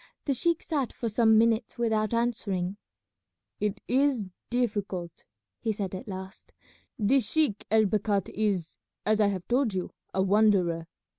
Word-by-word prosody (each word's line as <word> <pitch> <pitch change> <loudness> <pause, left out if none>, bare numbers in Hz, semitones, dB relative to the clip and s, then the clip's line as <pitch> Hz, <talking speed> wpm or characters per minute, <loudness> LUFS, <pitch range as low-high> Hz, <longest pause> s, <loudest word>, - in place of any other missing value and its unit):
The 280 - +2
sheik 335 +6 +1
sat 285 -6 -1
for 230 - -3
some 220 0 +4
minutes 230 +2 +2
without 220 -3 +1
answering. 205 -6 -1 0.8
"It 210 -1 -1
is 265 -4 +2 0.2
difficult," 205 -8 -2 0.3
he 225 - -1
said 200 -3 -4
at 190 +6 -6
last; 190 -1 -8 0.4
"this 230 +1 +2
sheik 305 -10 +1
El 220 0 +5
Bakhat 205 -1 0
is, 195 -6 -1 0.3
as 215 0 +3
I 210 - +5
have 190 -3 -3
told 245 -4 +1
you, 185 - -3 0.2
a 190 - +1
wanderer. 190 -5 +3
215 Hz, 145 wpm, -28 LUFS, 195-235 Hz, 0.8 s, El